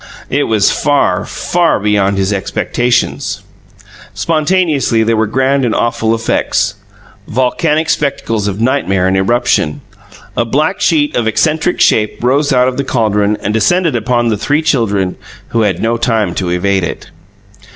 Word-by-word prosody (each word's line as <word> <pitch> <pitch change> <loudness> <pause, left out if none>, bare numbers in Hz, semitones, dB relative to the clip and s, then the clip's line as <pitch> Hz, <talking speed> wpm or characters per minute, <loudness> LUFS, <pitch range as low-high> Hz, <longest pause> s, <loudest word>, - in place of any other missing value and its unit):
It 145 +2 +1
was 110 -3 +2
far, 120 -10 +1
far 175 -1 0
beyond 100 -1 +1
his 95 +1 0
expectations. 120 +4 -1 0.7
Spontaneously 155 -7 +1
there 115 +1 +1
were 110 0 +1
grand 135 +4 +1
and 120 - 0
awful 115 -1 0
effects 115 -3 0 0.5
volcanic 150 +6 0
spectacles 140 -9 -1
of 100 0 -3
nightmare 95 -6 +1
and 95 - +1
eruption. 95 -6 +1 0.5
A - - +1
black 150 +10 -1
sheet 150 -3 +1
of 115 -2 0
eccentric 155 +9 0
shape 105 +1 +1
rose 140 +4 +2
out 125 -1 +3
of 130 - -2
the 140 - 0
caldron 105 -5 0
and 105 - -2
descended 165 - +1
upon 120 +1 0
the 110 - 0
three 145 +9 0
children, 105 - 0 0.3
who 115 - 0
had 100 -5 0
no 115 +1 +1
time 110 -5 0
to 90 -2 -2
evade 95 +2 0
it. - - -5
115 Hz, 150 wpm, -13 LUFS, 105-140 Hz, 0.7 s, out